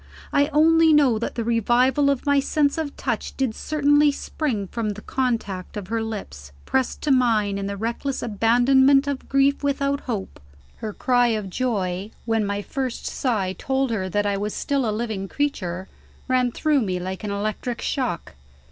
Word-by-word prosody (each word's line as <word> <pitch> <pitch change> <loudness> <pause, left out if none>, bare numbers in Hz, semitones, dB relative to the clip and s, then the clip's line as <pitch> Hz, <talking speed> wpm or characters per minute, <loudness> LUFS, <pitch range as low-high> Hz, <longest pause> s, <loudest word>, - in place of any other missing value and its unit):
I 285 0 +4
only 320 +1 +5
know 270 -7 +4
that 235 - -4
the 235 - -1
revival 240 +5 +3
of 280 -1 -1
my 285 -1 +4
sense 285 +2 +1
of 300 -3 -4
touch 240 -5 -3
did 265 -5 0
certainly 290 +2 +3
spring 270 -7 -3
from 220 +3 -3
the 210 - -11
contact 225 -8 -2
of 195 -3 -6
her 225 0 -1
lips, 195 - -6
pressed 265 -1 -1
to 300 - +1
mine 220 -6 +2
in 195 - -3
the 200 0 -4
reckless 235 +5 -3
abandonment 250 +5 +4
of 280 -2 -4
grief 275 +1 +2
without 280 0 0
hope. 205 -5 -4 0.4
Her 215 - -5
cry 245 +3 +2
of 215 -4 -2
joy, 195 -5 -1 0.2
when 225 -2 +1
my 200 0 -2
first 260 0 -4
sigh 205 -8 -1
told 265 +6 -1
her 190 -4 -2
that 205 +2 0
I 200 -1 0
was 205 +1 -3
still 275 -5 0
a 210 - -2
living 215 -4 -3
creature, 190 -10 -2 0.4
ran 255 -1 +2
through 300 +2 +1
me 185 -5 -1
like 185 +3 -5
an 210 - -3
electric 215 +4 -3
shock. 250 - -2
235 Hz, 175 wpm, -23 LUFS, 205-275 Hz, 0.4 s, only